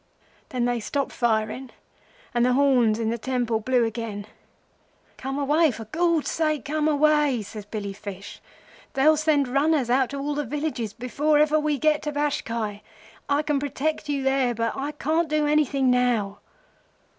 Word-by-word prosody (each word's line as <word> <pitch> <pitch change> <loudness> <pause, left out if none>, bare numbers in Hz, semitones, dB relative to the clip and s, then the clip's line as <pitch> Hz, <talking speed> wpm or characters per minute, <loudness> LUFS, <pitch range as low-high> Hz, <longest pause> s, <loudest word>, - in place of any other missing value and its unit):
"'Then 250 -2 -1
they 245 -1 0
stopped 275 +5 -2
firing 230 +2 -1 0.6
and 240 -1 +2
the 250 0 +3
horns 250 -5 +3
in 225 -1 -1
the 235 - -3
temple 240 -2 -1
blew 245 +1 +2
again. 220 -2 -5 0.9
'Come 270 +1 -4
away—for 285 -5 +1
Gord's 335 -2 +1
sake 310 -4 -1
come 305 +2 0
away!' 295 -5 +3
says 210 0 -9
Billy 205 -2 -5
Fish. 200 -1 -9 0.5
'They'll 300 +4 +4
send 300 -3 +2
runners 275 -1 +1
out 260 0 +3
to 280 - -5
all 285 +1 -2
the 295 +1 -1
villages 285 -5 -3
before 285 +5 0
ever 305 +1 +4
we 300 -1 0
get 305 +2 +2
to 300 - -3
Bashkai. 230 -8 -2 0.5
I 285 +1 +3
can 295 -2 0
protect 290 +2 -2
you 280 -2 -1
there, 265 -2 +1
but 230 0 -1
I 285 +2 -3
can't 315 +3 0
do 305 0 +1
anything 285 -3 +2
now. 235 -5 +1
270 Hz, 160 wpm, -25 LUFS, 235-300 Hz, 0.9 s, They'll